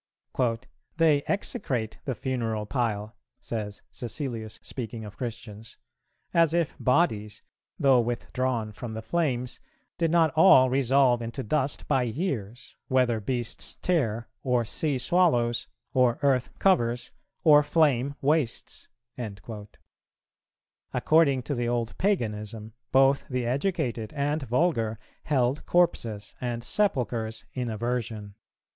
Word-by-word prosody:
"They 155 Hz, -4 st, +4 dB
execrate 125 Hz, -, -2 dB
the 130 Hz, -, -2 dB
funeral 115 Hz, -5 st, -2 dB
pile," 105 Hz, -2 st, -2 dB, 0.2 s
says 105 Hz, -3 st, -5 dB
Cæcilius, 120 Hz, -4 st, -4 dB
speaking 115 Hz, -3 st, -5 dB
of 105 Hz, -1 st, -10 dB
Christians, 115 Hz, -2 st, -7 dB, 0.6 s
"as 165 Hz, -1 st, +4 dB
if 170 Hz, -4 st, 0 dB
bodies, 110 Hz, -, +1 dB, 0.3 s
though 135 Hz, -2 st, +5 dB
withdrawn 120 Hz, -1 st, -1 dB
from 110 Hz, +2 st, -7 dB
the 110 Hz, -, -5 dB
flames, 125 Hz, -3 st, -1 dB, 0.4 s
did 165 Hz, -1 st, +2 dB
not 165 Hz, -2 st, +3 dB
all 130 Hz, -6 st, +7 dB
resolve 130 Hz, -2 st, +3 dB
into 115 Hz, +4 st, -4 dB
dust 140 Hz, +4 st, -1 dB
by 130 Hz, -, +2 dB
years, 120 Hz, -, -4 dB
whether 125 Hz, -3 st, +2 dB
beasts 120 Hz, +2 st, -3 dB
tear, 120 Hz, -11 st, 0 dB
or 125 Hz, -3 st, +1 dB
sea 145 Hz, +5 st, -1 dB
swallows, 125 Hz, -6 st, +2 dB, 0.3 s
or 125 Hz, -2 st, +3 dB
earth 130 Hz, -3 st, +2 dB
covers, 120 Hz, -11 st, +2 dB, 0.3 s
or 150 Hz, -2 st, +7 dB
flame 145 Hz, -3 st, +2 dB
wastes." 145 Hz, -4 st, -1 dB, 2.1 s
According 145 Hz, -5 st, +3 dB
to 145 Hz, -, -3 dB
the 120 Hz, -2 st, -1 dB
old 120 Hz, -2 st, -1 dB
Paganism, 110 Hz, -, -1 dB, 0.2 s
both 135 Hz, +1 st, +4 dB
the 125 Hz, -2 st, -2 dB
educated 130 Hz, -, -1 dB
and 145 Hz, +1 st, -1 dB
vulgar 120 Hz, -4 st, +1 dB, 0.3 s
held 135 Hz, -1 st, +1 dB
corpses 115 Hz, -12 st, +1 dB
and 120 Hz, -1 st, -3 dB
sepulchres 120 Hz, -, -1 dB
in 125 Hz, -2 st, -2 dB
aversion. 110 Hz, -2 st, -3 dB
125 Hz, 115 wpm, -27 LUFS, 115-145 Hz, 2.1 s, all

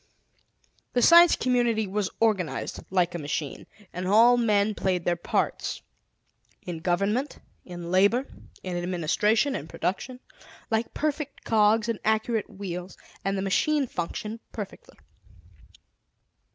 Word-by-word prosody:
The 245 Hz, -, +2 dB
Science 340 Hz, 0 st, +8 dB
Community 240 Hz, -3 st, +1 dB
was 200 Hz, 0 st, -2 dB
organized 190 Hz, -11 st, 0 dB
like 180 Hz, -2 st, +1 dB
a 175 Hz, -, -4 dB
machine: 145 Hz, -1 st, -4 dB, 0.3 s
and 180 Hz, +1 st, -4 dB
all 230 Hz, +5 st, +6 dB
men 215 Hz, -3 st, +2 dB
played 185 Hz, -3 st, -1 dB
their 175 Hz, -, +2 dB
parts, 170 Hz, -, -2 dB, 0.8 s
in 175 Hz, -3 st, -5 dB
government, 200 Hz, -, 0 dB, 0.3 s
in 175 Hz, -1 st, -7 dB
labor, 205 Hz, +8 st, +3 dB, 0.4 s
in 185 Hz, -1 st, -4 dB
administration, 185 Hz, -, +1 dB
in 145 Hz, -, -5 dB
production, 245 Hz, +10 st, -3 dB, 0.5 s
like 225 Hz, +1 st, -1 dB
perfect 300 Hz, -1 st, -3 dB
cogs 220 Hz, 0 st, +3 dB
and 230 Hz, -3 st, -2 dB
accurate 220 Hz, 0 st, 0 dB
wheels, 180 Hz, -2 st, -7 dB, 0.3 s
and 195 Hz, 0 st, -1 dB
the 190 Hz, -, -2 dB
machine 285 Hz, +9 st, +1 dB
functioned 210 Hz, +2 st, -5 dB
perfectly. 205 Hz, -3 st, -8 dB
210 Hz, 120 wpm, -26 LUFS, 180-230 Hz, 0.8 s, Science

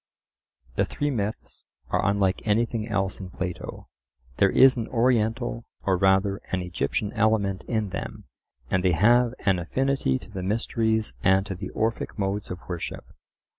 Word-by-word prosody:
The -, -, +3 dB
three 145 Hz, 0 st, -2 dB
myths 110 Hz, -3 st, -4 dB, 0.2 s
are -, -, +1 dB
unlike 100 Hz, -1 st, +2 dB
anything 110 Hz, +1 st, +1 dB
else 100 Hz, -3 st, -1 dB
in 95 Hz, -2 st, -7 dB
Plato. 90 Hz, -1 st, -6 dB, 0.5 s
There 100 Hz, -, +5 dB
is 130 Hz, +6 st, +6 dB
an 115 Hz, -3 st, -3 dB
Oriental, 115 Hz, -1 st, +1 dB, 0.2 s
or 95 Hz, -, +2 dB
rather 95 Hz, +1 st, +3 dB
an 90 Hz, -1 st, 0 dB
Egyptian 90 Hz, +3 st, -2 dB
element 105 Hz, -4 st, +1 dB
in 110 Hz, -4 st, -1 dB
them, -, -, -5 dB, 0.5 s
and 95 Hz, -1 st, +2 dB
they 90 Hz, -2 st, +3 dB
have 120 Hz, +7 st, +4 dB
an 95 Hz, -3 st, +3 dB
affinity 130 Hz, -, 0 dB
to 105 Hz, -, -13 dB
the 95 Hz, -2 st, -5 dB
mysteries 110 Hz, +2 st, 0 dB
and 95 Hz, +1 st, +4 dB
to 100 Hz, -, -4 dB
the 95 Hz, +1 st, -6 dB
Orphic 110 Hz, +1 st, -2 dB
modes 100 Hz, 0 st, -2 dB
of 90 Hz, -, -7 dB
worship. 85 Hz, -2 st, -5 dB
100 Hz, 155 wpm, -26 LUFS, 95-115 Hz, 0.5 s, is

